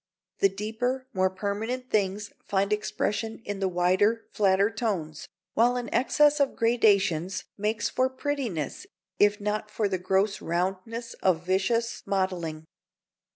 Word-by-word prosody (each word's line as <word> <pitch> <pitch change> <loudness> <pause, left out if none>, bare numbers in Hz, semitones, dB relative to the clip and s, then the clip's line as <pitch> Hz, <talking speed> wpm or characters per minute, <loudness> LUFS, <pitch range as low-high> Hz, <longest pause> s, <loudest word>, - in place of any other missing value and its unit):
The 195 - +5
deeper, 225 +6 -2
more 190 -1 +2
permanent 215 +7 -3
things 205 0 0
find 200 +1 +1
expression 215 +1 -2
in 205 -1 -4
the 195 - +1
wider, 185 +5 +2
flatter 200 +1 +3
tones, 190 -9 -3 0.3
while 240 +2 +3
an 245 -1 -4
excess 295 +3 +4
of 280 -1 +2
gradations 200 -6 +2
makes 210 +2 -1
for 255 0 +1
prettiness, 260 - -3 0.3
if 205 0 +4
not 210 +1 -2
for 210 0 0
the 190 -2 -2
gross 190 +3 +1
roundnesses 190 +7 -2
of 175 -2 +2
vicious 230 +5 0
modelling. 180 -5 -1
205 Hz, 130 wpm, -27 LUFS, 190-230 Hz, 0.3 s, The